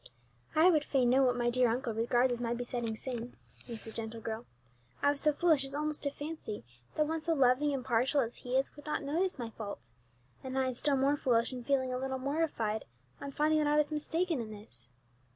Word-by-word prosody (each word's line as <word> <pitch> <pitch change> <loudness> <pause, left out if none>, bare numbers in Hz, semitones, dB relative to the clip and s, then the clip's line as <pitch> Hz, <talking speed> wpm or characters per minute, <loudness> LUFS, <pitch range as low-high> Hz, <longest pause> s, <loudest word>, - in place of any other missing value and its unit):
"I 330 +4 +7
would 305 -3 +3
fain 255 -4 +2
know 265 +2 +5
what 250 -2 +3
my 240 0 +1
dear 250 -1 +4
uncle 235 0 -1
regards 240 +3 +2
as 240 - -4
my 235 0 -1
besetting 240 -2 -3
sin," 240 0 -5 0.3
mused 230 -3 -6
the 225 - -7
gentle 225 0 -5
girl. 225 +1 -5 0.6
"I 285 - +5
was 285 - +1
so 300 - +5
foolish 310 -2 +3
as 270 +1 -3
almost 300 0 -1
to 285 - +1
fancy 290 - -6 0.3
that 305 - +2
one 320 +1 -2
so 330 +1 +2
loving 270 +2 +4
and 270 -3 -3
partial 255 +4 +2
as 235 -1 -3
he 250 +1 -1
is 270 - -1
would 295 0 -13
not 300 - -1
notice 335 +6 0
my 235 -3 -5
faults, 200 - -8 0.5
and 260 0 -4
I 265 - +2
am 255 - -1
still 280 +3 +2
more 275 +2 +2
foolish 240 -2 +2
in 250 -1 -6
feeling 260 -1 +1
a 250 - -2
little 265 0 -2
mortified 260 -6 -1 0.4
on 280 - -5
finding 305 +2 +2
that 300 - +2
I 295 0 +3
was 300 0 +2
mistaken 320 0 0
in 220 - -6
this. 125 - -10
260 Hz, 225 wpm, -32 LUFS, 235-295 Hz, 0.6 s, I